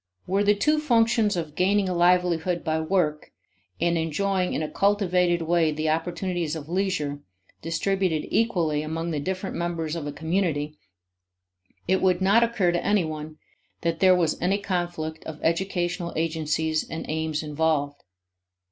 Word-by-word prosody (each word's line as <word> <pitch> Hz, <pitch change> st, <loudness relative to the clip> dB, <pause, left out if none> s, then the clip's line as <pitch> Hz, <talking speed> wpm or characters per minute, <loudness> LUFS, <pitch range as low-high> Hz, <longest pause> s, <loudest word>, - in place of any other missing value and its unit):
Were 195 Hz, +2 st, +1 dB
the 205 Hz, 0 st, +4 dB
two 300 Hz, +9 st, +2 dB
functions 230 Hz, -6 st, +2 dB
of 160 Hz, -3 st, -4 dB
gaining 195 Hz, +3 st, +2 dB
a 185 Hz, -, -1 dB
livelihood 175 Hz, 0 st, +2 dB
by 160 Hz, 0 st, 0 dB
work 160 Hz, -3 st, 0 dB, 0.5 s
and 170 Hz, 0 st, +1 dB
enjoying 185 Hz, +4 st, 0 dB
in -, -, -1 dB
a -, -, -2 dB
cultivated 180 Hz, -4 st, +2 dB
way 165 Hz, -1 st, +2 dB
the 155 Hz, +1 st, -1 dB
opportunities 170 Hz, 0 st, -1 dB
of 155 Hz, -2 st, -7 dB
leisure, 175 Hz, -6 st, -1 dB, 0.4 s
distributed 170 Hz, -1 st, 0 dB
equally 170 Hz, -10 st, +1 dB
among 165 Hz, +2 st, -3 dB
the 150 Hz, -, -1 dB
different 190 Hz, +5 st, -3 dB
members 170 Hz, -2 st, -2 dB
of 155 Hz, -3 st, -4 dB
a -, -, -3 dB
community, 160 Hz, -2 st, -1 dB, 1.1 s
it 190 Hz, 0 st, +2 dB
would 185 Hz, -2 st, +3 dB
not 200 Hz, +5 st, +4 dB
occur 220 Hz, -7 st, +1 dB
to 175 Hz, -, -1 dB
any 205 Hz, -4 st, +2 dB
one 155 Hz, 0 st, -6 dB, 0.4 s
that 165 Hz, -1 st, -1 dB
there 185 Hz, -1 st, +6 dB
was 170 Hz, -3 st, 0 dB
any 190 Hz, +3 st, +2 dB
conflict 175 Hz, -5 st, -3 dB
of 155 Hz, -1 st, -7 dB
educational 175 Hz, 0 st, -1 dB
agencies 160 Hz, -1 st, 0 dB
and 160 Hz, -, -5 dB
aims 160 Hz, 0 st, -2 dB
involved. 150 Hz, -2 st, -1 dB
170 Hz, 150 wpm, -25 LUFS, 160-190 Hz, 1.1 s, there